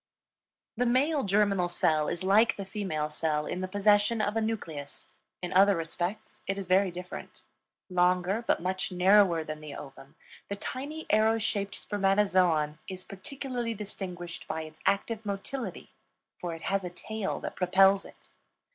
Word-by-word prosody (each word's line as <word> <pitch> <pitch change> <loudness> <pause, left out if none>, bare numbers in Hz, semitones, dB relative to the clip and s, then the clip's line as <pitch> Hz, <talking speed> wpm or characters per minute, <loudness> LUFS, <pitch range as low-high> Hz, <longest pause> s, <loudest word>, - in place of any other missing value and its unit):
The 245 +1 +2
male 280 +5 +3
germinal 195 -2 +2
cell 155 -4 +2
is 170 +1 -2
like 215 +4 +4
the 200 - -6
female 160 -7 -3
cell 150 -1 0
in 180 - -3
the 185 - -2
possession 205 +3 +3
of 210 0 0
a 225 - +2
nucleus; 165 -11 -5 0.3
in 180 - -3
other 195 +2 +6
respects 175 +5 -4
it 195 +1 -1
is 195 - -4
very 185 +2 +4
different. 180 +1 -8 0.4
Longer 180 +2 +2
but - - +2
much 185 +1 -1
narrower 180 -2 +5
than 155 0 -6
the 150 -2 -8
ovum, 135 -1 -11 0.3
the 200 - -2
tiny 285 +9 -5
arrow 220 +1 +4
shaped 200 -2 -1
spermatozoon 185 -6 +2
is 185 -1 -7
particularly 240 +3 -4
distinguished 180 -4 -7
by 160 0 -3
its 155 0 -12
active 220 +2 +1
motility, 210 +6 -5 0.5
for 170 -2 -4
it 165 - -11
has 195 0 0
a 180 - -3
tail 210 +3 -4
that - - -6
propels 190 +2 +4
it. - - -15
195 Hz, 155 wpm, -29 LUFS, 175-210 Hz, 0.5 s, other